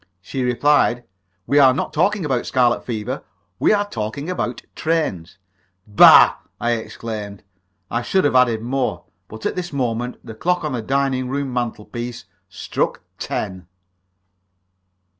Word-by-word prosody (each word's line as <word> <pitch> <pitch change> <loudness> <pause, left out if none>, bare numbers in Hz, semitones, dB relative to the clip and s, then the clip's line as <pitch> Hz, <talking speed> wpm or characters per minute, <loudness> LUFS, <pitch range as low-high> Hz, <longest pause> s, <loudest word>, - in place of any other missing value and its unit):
She 130 +8 -5
replied: 125 0 +2 0.4
"We 145 - +3
are 130 -2 +6
not - - -3
talking 190 +3 +1
about 130 -4 -1
scarlet 125 -3 +2
fever; 110 -4 -4 0.4
we - - +3
are 205 -1 +2
talking 125 - -4
about 125 -9 -3
trains!" 155 - -2 0.5
"Bah!" 105 -2 +7 0.2
I 120 - 0
exclaimed. 110 -3 -5 0.5
I 115 - 0
should 190 +9 +1
have 145 - +1
added 120 -3 +3
more, 125 -8 -2 0.2
but 110 +2 -10
at - - -1
this 180 -1 -4
moment 125 -3 -2
the 110 - -8
clock 180 +10 -1
on 150 - -2
the 120 - -2
dining 135 +1 0
room 135 -1 -2
mantelpiece 120 -1 -4 0.2
struck - - -3 0.2
ten. 95 -4 -4
125 Hz, 140 wpm, -21 LUFS, 110-140 Hz, 0.5 s, Bah